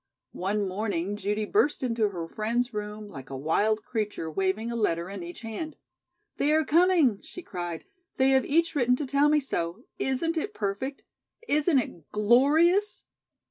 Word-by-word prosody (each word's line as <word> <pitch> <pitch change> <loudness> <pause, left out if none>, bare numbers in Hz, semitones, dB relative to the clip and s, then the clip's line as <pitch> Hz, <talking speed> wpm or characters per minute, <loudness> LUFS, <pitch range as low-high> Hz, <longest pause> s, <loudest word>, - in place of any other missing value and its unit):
One 200 +2 -1
morning 200 -1 -2
Judy 210 +1 -1
burst 300 - +1
into 230 -4 +1
her 170 -4 -5
friend's 235 +6 -1
room 210 0 -5
like 135 -9 -10
a 135 - -5
wild 210 +10 +1
creature, 210 -8 -3
waving 195 +7 -1
a - - -3
letter 175 -5 0
in 200 -2 -6
each 175 +4 -8
hand. 240 +8 -6 0.6
"They 290 - +2
are 315 0 +3
coming," 325 - +4
she 360 - -10
cried. 175 - -5 0.3
"They 265 0 +4
have 265 0 +4
each 335 +3 +2
written 250 -4 +3
to 290 - -3
tell 280 +2 +3
me 300 0 +4
so. 190 -6 -3 0.2
Isn't 325 +6 0
it 415 +7 -3
perfect? 210 +8 -3 0.4
Isn't 300 +1 +3
it 175 - -3
glorious?" 300 - +3
225 Hz, 165 wpm, -27 LUFS, 195-285 Hz, 0.6 s, coming